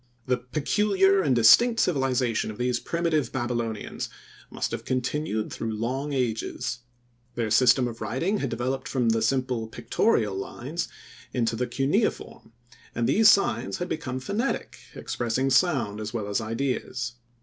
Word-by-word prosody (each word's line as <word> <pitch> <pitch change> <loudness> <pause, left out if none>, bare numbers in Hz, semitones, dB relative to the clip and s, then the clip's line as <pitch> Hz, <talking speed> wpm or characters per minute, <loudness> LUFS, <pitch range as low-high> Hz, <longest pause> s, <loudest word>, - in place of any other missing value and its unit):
The 125 -1 +1
peculiar 195 - +2
and 140 -7 +2
distinct 230 - +6
civilization 130 -8 +1
of 105 - -7
these 125 -1 0
primitive 165 -6 -1
Babylonians 120 -4 -3 0.4
must - - -3
have - - -4
continued 130 -3 -2
through 115 -1 -3
long 130 +6 -2
ages. 125 0 -2 0.6
Their 115 -3 -1
system 125 +2 +5
of 115 -1 -8
writing 170 - -1
had 135 - -2
developed 130 +3 -2
from 125 -4 +1
the 115 0 +2
simple 125 -1 0
pictorial 115 - 0
lines 145 - -4 0.5
into 115 -2 +1
the 125 +2 -1
cuneiform 145 - -1 0.4
and 120 -1 0
these 215 - +6
signs 200 - +2
had 180 +1 -4
become 130 -5 -3
phonetic, 205 - -2 0.2
expressing 125 +3 -1
sound 130 - +2
as 110 +2 -5
well 105 -3 -2
as 105 +2 -1
ideas. 120 +1 -2
125 Hz, 140 wpm, -26 LUFS, 115-150 Hz, 0.6 s, distinct